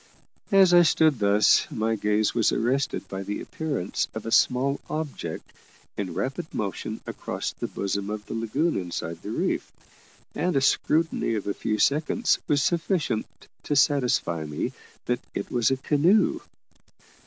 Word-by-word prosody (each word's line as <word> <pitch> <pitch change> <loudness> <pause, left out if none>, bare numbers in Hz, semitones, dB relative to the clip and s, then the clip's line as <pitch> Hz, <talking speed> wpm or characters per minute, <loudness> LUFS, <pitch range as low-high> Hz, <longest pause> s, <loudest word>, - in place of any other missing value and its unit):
As 190 -2 +6
I 175 - +8
stood 155 -5 +3
thus, 100 0 +4
my 110 0 -1
gaze 105 0 +1
was 115 -3 +2
arrested 135 +5 0
by 95 0 -5
the 100 +1 -4
appearance 145 - -3
of 110 - -5
a 115 - -4
small 135 +4 +3
object 155 -2 -5 0.4
in 95 -5 -4
rapid 135 - -3
motion 110 +1 -4
across - - -4
the - - -5
bosom 100 0 -3
of 105 0 -5
the - - -7
lagoon 125 +9 0
inside 85 -2 -4
the - - -7
reef, - - -1 0.6
and 180 -2 -1
a - - +5
scrutiny 155 -3 +1
of 105 - -3
a 100 - -1
few 110 +1 -2
seconds 155 - +2
was 145 -2 +2
sufficient 165 - 0 0.3
to 145 - -2
satisfy 125 - +2
me 75 -1 -3 0.3
that 125 0 0 0.2
it - - -4
was 120 -3 +2
a 135 - +1
canoe. 160 +10 +3
120 Hz, 155 wpm, -26 LUFS, 105-150 Hz, 0.6 s, I